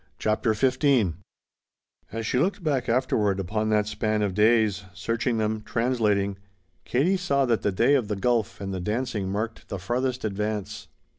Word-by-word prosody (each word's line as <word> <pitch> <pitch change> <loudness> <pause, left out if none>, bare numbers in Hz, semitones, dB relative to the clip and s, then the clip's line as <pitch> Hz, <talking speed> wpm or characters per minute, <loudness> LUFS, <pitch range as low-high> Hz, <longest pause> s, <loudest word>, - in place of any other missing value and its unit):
CHAPTER 110 +1 +1
XV 130 - +2 1.0
As 115 +1 -4
she 125 - +1
looked 185 +4 0
back 135 -6 0
afterward 110 -5 +1
upon 110 +4 -1
that 105 -1 +2
span 105 0 -1
of 100 -2 -1
days, 105 -1 +3
searching 115 +5 -1
them, 110 0 -1
translating, 105 -5 0 0.5
Katie 165 +10 +2
saw 140 -7 +1
that 115 -3 +1
the 105 - +1
day 115 +9 +3
of 130 -7 +2
the 105 - -2
golf 115 +1 0
and 95 -1 -4
the 95 - -3
dancing 105 -1 -2
marked 110 +3 -4
the 100 - -3
farthest 125 +6 -2
advance. 105 0 -3
110 Hz, 160 wpm, -26 LUFS, 105-125 Hz, 1.0 s, days